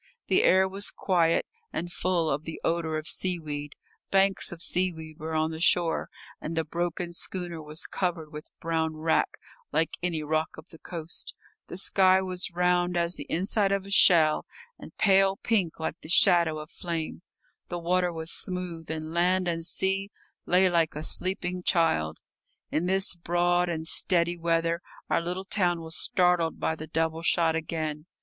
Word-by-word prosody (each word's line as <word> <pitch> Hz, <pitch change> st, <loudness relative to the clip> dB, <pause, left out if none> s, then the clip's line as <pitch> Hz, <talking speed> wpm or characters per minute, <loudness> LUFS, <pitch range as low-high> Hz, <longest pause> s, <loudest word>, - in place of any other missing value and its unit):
The -, -, +4 dB
air 190 Hz, +1 st, +5 dB
was 195 Hz, +2 st, -2 dB
quiet 170 Hz, -3 st, +1 dB, 0.3 s
and 175 Hz, 0 st, -4 dB
full 175 Hz, -2 st, 0 dB
of 145 Hz, 0 st, -1 dB
the 160 Hz, -, -7 dB
odour 165 Hz, -1 st, 0 dB
of 155 Hz, +1 st, -5 dB
seaweed; 150 Hz, -5 st, -1 dB, 0.3 s
banks 195 Hz, 0 st, +2 dB
of 175 Hz, -, -8 dB
seaweed 165 Hz, -3 st, -2 dB
were 160 Hz, +1 st, -4 dB
on 155 Hz, 0 st, +1 dB
the 160 Hz, -, -6 dB
shore, 175 Hz, -1 st, +2 dB, 0.3 s
and 165 Hz, +1 st, -5 dB
the 160 Hz, -, +2 dB
broken 175 Hz, +2 st, -3 dB
schooner 175 Hz, -2 st, -3 dB
was 150 Hz, +1 st, -4 dB
covered 170 Hz, -5 st, -3 dB
with 150 Hz, 0 st, -8 dB
brown 160 Hz, -1 st, -1 dB
wrack, 160 Hz, +1 st, +1 dB, 0.3 s
like 160 Hz, -, 0 dB
any 170 Hz, -3 st, -1 dB
rock 155 Hz, +1 st, -1 dB
of 160 Hz, +2 st, -12 dB
the 160 Hz, -, -14 dB
coast; 165 Hz, -2 st, -4 dB, 0.3 s
the -, -, -7 dB
sky 190 Hz, -1 st, +4 dB
was 185 Hz, 0 st, -3 dB
round 180 Hz, 0 st, +2 dB
as 170 Hz, 0 st, +1 dB
the -, -, -7 dB
inside 195 Hz, +3 st, +1 dB
of 195 Hz, -1 st, 0 dB
a 200 Hz, -, -9 dB
shell, 165 Hz, -5 st, +5 dB, 0.3 s
and -, -, -12 dB
pale 195 Hz, -1 st, +4 dB
pink 195 Hz, -10 st, 0 dB
like 160 Hz, +1 st, -4 dB
the 155 Hz, -, -10 dB
shadow 175 Hz, -5 st, +5 dB
of 155 Hz, +3 st, -8 dB
flame; 165 Hz, -2 st, -4 dB, 0.5 s
the 175 Hz, -, -3 dB
water 180 Hz, +1 st, +1 dB
was 160 Hz, 0 st, -4 dB
smooth, 180 Hz, -3 st, -4 dB
and 160 Hz, 0 st, -4 dB
land 180 Hz, +2 st, +2 dB
and 165 Hz, -1 st, -2 dB
sea 195 Hz, +2 st, 0 dB, 0.4 s
lay 185 Hz, +2 st, +5 dB
like 170 Hz, -4 st, +1 dB
a 150 Hz, -, -4 dB
sleeping 180 Hz, +1 st, 0 dB
child. 80 Hz, -, +1 dB, 0.5 s
In 165 Hz, +3 st, 0 dB
this 190 Hz, +1 st, +2 dB
broad 175 Hz, +1 st, +1 dB
and 160 Hz, -1 st, -3 dB
steady 175 Hz, 0 st, +3 dB
weather 165 Hz, 0 st, 0 dB, 0.3 s
our -, -, +3 dB
little 180 Hz, +3 st, -4 dB
town 180 Hz, -4 st, +1 dB
was 160 Hz, 0 st, -3 dB
startled 180 Hz, -3 st, +2 dB
by 160 Hz, -, 0 dB
the 155 Hz, 0 st, -8 dB
double 160 Hz, 0 st, -1 dB
shot 165 Hz, 0 st, +2 dB
again. 155 Hz, -1 st, -3 dB
170 Hz, 170 wpm, -27 LUFS, 160-180 Hz, 0.5 s, air